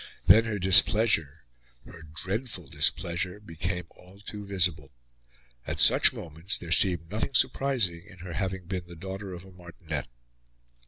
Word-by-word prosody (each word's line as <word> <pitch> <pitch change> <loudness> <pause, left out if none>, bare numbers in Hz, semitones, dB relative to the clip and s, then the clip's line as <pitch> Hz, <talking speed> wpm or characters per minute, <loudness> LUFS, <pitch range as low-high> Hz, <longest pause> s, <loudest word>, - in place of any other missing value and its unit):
Then 115 +1 +6
her 110 -2 -3
displeasure 95 -4 +4 0.4
her 80 - -13
dreadful 90 - -4
displeasure 90 +7 -2
became 90 -1 -5
all 95 +2 -19
too 105 0 -9
visible. 85 -8 -1 0.8
At - - -4
such - - +6
moments 85 +5 -2
there 85 -2 -9
seemed 85 -2 +4
nothing 110 +5 -3
surprising 105 -11 0
in 100 -2 -15
her 90 0 -9
having 95 -2 -4
been 90 -1 -5
the 85 - -12
daughter 95 +3 -7
of 90 0 -10
a 95 - -15
martinet. 85 -5 -8
90 Hz, 145 wpm, -27 LUFS, 85-100 Hz, 0.8 s, Then